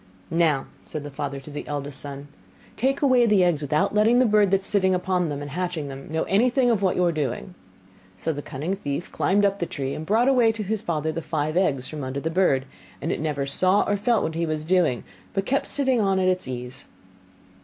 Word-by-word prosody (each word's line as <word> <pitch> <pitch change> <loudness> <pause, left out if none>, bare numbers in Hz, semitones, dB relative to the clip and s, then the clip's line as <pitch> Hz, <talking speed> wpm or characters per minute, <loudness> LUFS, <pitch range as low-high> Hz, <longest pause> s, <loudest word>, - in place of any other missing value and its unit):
'Now,' 160 -5 +2 0.2
said 155 - -6
the 145 - -7
father 140 0 -4
to 135 +2 -12
the 145 - -6
eldest 145 -1 -4
son, 140 0 -7 0.5
'take 270 +4 0
away 255 -3 +5
the 205 -4 +4
eggs 170 -4 +2
without 150 +1 +1
letting 215 +3 +4
the 255 - +5
bird 210 -3 +4
that 195 0 +2
is - - -3
sitting 190 -2 +3
upon 180 -2 0
them 145 0 -4
and 145 - -7
hatching 175 -3 -3
them 135 +2 -9
know 160 0 0
anything 245 +4 +3
of 215 -4 +1
what 190 -2 +2
you 180 - +2
are 170 - +3
doing.' 150 +3 -3 0.6
So 160 - -2
the 145 - -5
cunning 150 +7 -4
thief 170 -3 -4
climbed 200 +2 +2
up 200 0 +1
the 170 - -1
tree, 135 -1 -4
and 155 - -5
brought 220 +9 +2
away 245 -4 +4
to 220 -1 -4
his 210 +1 -2
father 160 -2 -1
the 165 - -4
five 155 -1 -2
eggs 140 -9 +1
from 150 -2 -6
under 130 +1 -3
the 160 +3 -3
bird; 160 -7 +2 0.3
and 160 - -2
it - - -2
never 150 -3 -1
saw 185 +8 +3
or 205 - 0
felt 230 +3 +1
what 160 - -2
he 165 +1 -1
was 155 -1 -3
doing, 175 -8 +2 0.3
but 195 0 0
kept 275 +2 0
sitting 265 -4 +1
on 195 -2 +2
at 185 -1 +2
its 185 -4 0
ease. 125 +2 -6
170 Hz, 235 wpm, -24 LUFS, 145-200 Hz, 0.6 s, away